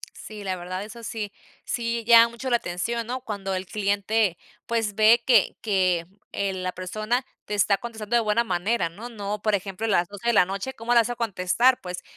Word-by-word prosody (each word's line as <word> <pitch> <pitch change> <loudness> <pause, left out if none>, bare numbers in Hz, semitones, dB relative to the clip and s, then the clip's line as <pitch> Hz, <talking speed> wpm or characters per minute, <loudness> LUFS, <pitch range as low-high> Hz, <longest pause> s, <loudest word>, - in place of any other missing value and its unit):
Sí, 210 -1 -9
la 190 -1 -2
verdad, 185 +2 -5
eso 230 +2 -10
sí 215 -2 -4 0.3
sí 235 -1 -2
llama 230 0 +8
mucho 235 +3 -5
la 240 - +4
atención, 230 +5 -3
¿no?, 255 +1 -3
cuando 200 -5 -4
el 185 0 -3
cliente 200 -1 0 0.3
pues, 225 -4 -1
ve 220 +2 +6
que 235 -6 +4
que, 185 -5 +1 0.2
eh, 200 -1 -1
la 185 -1 -3
persona 215 +8 -2 0.2
te - - -5
está 200 -1 +3
contestando 225 0 -4
de - - +6
buena 215 +2 +2
manera, 185 -1 0
¿no? 220 +9 -9
No, 205 -2 -5
por 215 -1 +2
ejemplo, 195 +2 -4
a - - -1
las 175 -3 +2
12, 205 +3 -7
de 235 - +3
la 180 - +6
noche, 195 +8 -4
¿cómo 230 +2 -4
le 235 - +7
vas 230 +1 +2
a 245 - -3
contestar?, 230 +3 +2
pues, 180 -1 -6
210 Hz, 210 wpm, -25 LUFS, 190-235 Hz, 0.3 s, llama